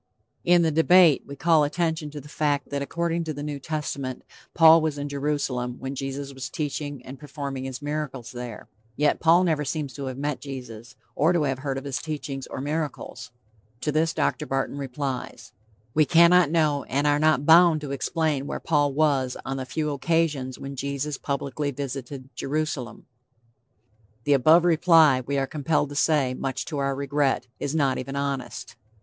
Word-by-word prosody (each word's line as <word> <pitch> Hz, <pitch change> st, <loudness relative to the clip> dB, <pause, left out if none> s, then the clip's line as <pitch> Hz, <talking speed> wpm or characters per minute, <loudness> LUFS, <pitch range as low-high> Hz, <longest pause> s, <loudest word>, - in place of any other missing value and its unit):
In 175 Hz, 0 st, +5 dB
The 160 Hz, -, +2 dB
Debate 165 Hz, -1 st, +5 dB
we 140 Hz, -, -7 dB
call 160 Hz, +1 st, +3 dB
attention 160 Hz, 0 st, -1 dB
to 150 Hz, 0 st, -8 dB
the 145 Hz, -, -12 dB
fact 145 Hz, -1 st, -1 dB
that 140 Hz, 0 st, -2 dB
according 170 Hz, +3 st, -1 dB
to 155 Hz, -2 st, -4 dB
the 145 Hz, -, -5 dB
New 145 Hz, -1 st, -4 dB
Testament, 140 Hz, -3 st, -4 dB, 0.3 s
Paul 165 Hz, 0 st, +8 dB
was 155 Hz, -2 st, -1 dB
in 145 Hz, 0 st, -3 dB
Jerusalem 140 Hz, -4 st, -2 dB
when 135 Hz, +1 st, -5 dB
Jesus 135 Hz, +1 st, -5 dB
was 130 Hz, -1 st, -6 dB
teaching 145 Hz, -2 st, -4 dB
and 130 Hz, +1 st, -9 dB
performing 140 Hz, -2 st, -5 dB
his 130 Hz, +1 st, -6 dB
miracles 145 Hz, -5 st, -4 dB
there. 120 Hz, -3 st, -8 dB, 0.3 s
Yet 150 Hz, 0 st, +2 dB
Paul 170 Hz, +3 st, +5 dB
never 160 Hz, -4 st, +1 dB
seems 145 Hz, -1 st, -3 dB
to 140 Hz, -, -6 dB
have 130 Hz, -1 st, -5 dB
met 145 Hz, 0 st, -3 dB
Jesus, 125 Hz, -4 st, -8 dB, 0.2 s
or 160 Hz, +5 st, +3 dB
to 170 Hz, -3 st, +2 dB
have 135 Hz, -2 st, -1 dB
heard 135 Hz, -1 st, -3 dB
of 135 Hz, -, -5 dB
his 140 Hz, -2 st, -3 dB
teachings 145 Hz, -3 st, -5 dB
or -, -, -6 dB
miracles. 150 Hz, 0 st, -4 dB, 0.5 s
To 150 Hz, -, 0 dB
this 160 Hz, +2 st, +2 dB
Dr. 150 Hz, -, -1 dB
Barton 135 Hz, +1 st, -2 dB
replies: 135 Hz, -1 st, -5 dB, 0.4 s
"We 155 Hz, 0 st, +4 dB
cannot 170 Hz, +1 st, +6 dB
know 150 Hz, -4 st, +1 dB
and 140 Hz, +3 st, -1 dB
are 145 Hz, 0 st, +3 dB
not 155 Hz, -2 st, +3 dB
bound 165 Hz, 0 st, +7 dB
to 145 Hz, -2 st, -6 dB
explain 145 Hz, 0 st, -1 dB
where -, -, -4 dB
Paul 145 Hz, -3 st, +1 dB
was 140 Hz, -4 st, +1 dB
on 135 Hz, 0 st, -3 dB
the 130 Hz, -1 st, -5 dB
few 150 Hz, +1 st, -2 dB
occasions 145 Hz, -3 st, 0 dB
when 140 Hz, 0 st, -7 dB
Jesus 140 Hz, +1 st, -3 dB
publicly 140 Hz, +1 st, -2 dB
visited 135 Hz, -1 st, -6 dB
Jerusalem." 145 Hz, -3 st, -3 dB, 1.2 s
The 145 Hz, -, +3 dB
above 155 Hz, +6 st, +5 dB
reply, 160 Hz, -5 st, +5 dB
we 140 Hz, +3 st, -2 dB
are 135 Hz, -, +1 dB
compelled 150 Hz, 0 st, 0 dB
to 145 Hz, -, -8 dB
say, 140 Hz, -4 st, +2 dB
much 135 Hz, 0 st, -3 dB
to 150 Hz, -4 st, -4 dB
our 140 Hz, 0 st, 0 dB
regret, 140 Hz, -2 st, 0 dB
is 145 Hz, +2 st, -3 dB
not 140 Hz, -4 st, +1 dB
even 135 Hz, +2 st, -5 dB
honest. 140 Hz, -2 st, -4 dB
145 Hz, 180 wpm, -25 LUFS, 135-155 Hz, 1.2 s, Paul